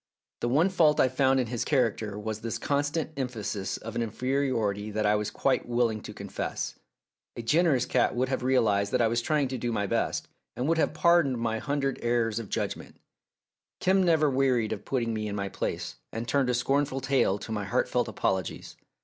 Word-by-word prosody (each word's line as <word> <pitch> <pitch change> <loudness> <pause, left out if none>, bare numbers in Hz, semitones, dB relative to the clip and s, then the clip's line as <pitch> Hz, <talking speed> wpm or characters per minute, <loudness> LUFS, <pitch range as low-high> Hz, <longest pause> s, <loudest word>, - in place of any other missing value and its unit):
The 120 - -1
one 155 +9 +3
fault 160 -5 +3
I - - +6
found 130 +1 +3
in 125 - +1
his 120 0 -2
character 115 -7 0
was 110 0 -4
this 115 0 -3
constant 145 +3 -1
emphasis 105 -7 -3
of 115 - -8
an - - 0
inferiority 115 -4 -1
that 105 0 -1
I 105 - +4
was 105 0 0
quite 130 +3 0
willing 120 -3 +1
to 105 - -8
confess. 100 -1 -4 0.6
A 120 - -6
generous 145 -1 +3
cat - - +1
would 125 +2 +1
have 130 0 -2
realised 105 -6 +2
that 125 - +3
I - - +4
was 115 +1 0
trying 150 +2 +1
to 130 -1 -4
do 120 +1 -1
my 100 -3 0
best, - - -1 0.3
and 125 - -2
would 165 0 +2
have 155 - +1
pardoned 170 -6 +4
my 115 -1 -1
hundred 140 -1 -1
errors 115 -2 +1
of 110 -4 -7
judgment. - - -3 0.8
Kim 190 +1 +3
never 160 -4 +4
wearied 130 -5 +2
of 105 - -8
putting 120 -4 -1
me 110 -1 -2
in 100 - -4
my 100 -1 -2
place, - - -4
and 115 +1 -4
turned 130 0 +2
a 125 - +2
scornful 135 +2 +1
tail 130 -7 +2
to 110 - -8
my 105 -2 -2
heartfelt 95 - 0
apologies. 95 -2 -2
120 Hz, 200 wpm, -28 LUFS, 110-135 Hz, 0.8 s, I